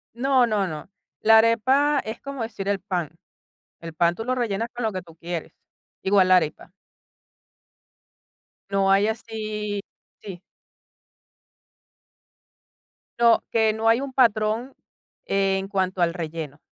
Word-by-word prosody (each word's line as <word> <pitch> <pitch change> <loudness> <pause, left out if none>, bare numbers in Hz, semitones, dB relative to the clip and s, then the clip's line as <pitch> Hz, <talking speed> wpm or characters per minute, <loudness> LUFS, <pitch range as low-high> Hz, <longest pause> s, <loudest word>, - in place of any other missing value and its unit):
No, 260 0 +3
no, 210 -3 0
no, 160 +3 -7 0.3
la 220 0 +7
arepa 260 +6 +3
es 220 0 -7
como 275 -3 -6
decir 210 -3 -5
el 200 -1 0
pan. 180 -5 -3 0.7
El 165 -1 -8
pan 170 +1 +2
tú 225 - -5
lo 255 +1 0
rellenas 230 -2 -2
con 245 - -5
lo 220 - 0
que 185 - -5
tú 165 -2 -17
quieres, 170 0 -6 0.5
igual 190 -1 +3
la 185 - +7
arepa. 180 +1 -2 2.0
No 195 -1 +2
hay 200 +2 +4
así 215 -2 -4 0.4
sí. 190 -4 -8 2.8
No, 235 -1 +4
que 220 -1 +2
no 220 +1 0
hay 230 +2 +4
un 275 -1 -5
patrón 230 0 +1 0.5
en 195 0 0
cuanto 190 -2 -1
al 170 0 +1
relleno, 160 -4 -6
210 Hz, 135 wpm, -24 LUFS, 185-230 Hz, 2.8 s, la